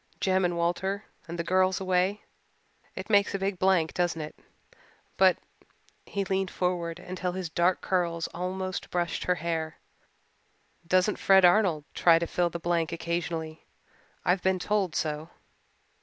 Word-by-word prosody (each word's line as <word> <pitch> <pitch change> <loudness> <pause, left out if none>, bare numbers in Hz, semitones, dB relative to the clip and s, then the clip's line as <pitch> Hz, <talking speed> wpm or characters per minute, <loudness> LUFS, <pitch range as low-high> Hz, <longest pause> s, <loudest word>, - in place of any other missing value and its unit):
"Jem 190 0 +2
and 175 -1 0
Walter 190 +4 -1 0.2
and 170 +1 -6
the 170 - -1
girls 185 +1 +2
away 185 +2 0 0.7
it 190 - -6
makes 200 -2 +3
a - - +1
big 195 -1 -2
blank, 185 -4 +2
doesn't 175 -2 0
it? 155 0 -6 0.8
But - - +5 0.4
" - - -40 0.3
he 200 - -2
leaned 190 0 0
forward 175 -2 -2
until 180 0 -4
his 180 -3 -4
dark 175 +2 +2
curls 170 -3 0
almost 185 +1 -4
brushed 175 -2 -2
her 180 - +2
hair 160 -1 -3 1.1
"doesn't 185 +4 +2
Fred 190 -1 +6
Arnold 175 -5 +3
try 165 -1 +5
to 170 - -1
fill 175 +1 0
the 170 - -5
blank 170 -1 0
occasionally. 165 -1 -3 0.6
I've 180 +1 +2
been 190 0 +2
told 195 -2 -1
so." 155 +1 -2
180 Hz, 150 wpm, -28 LUFS, 170-190 Hz, 1.1 s, Fred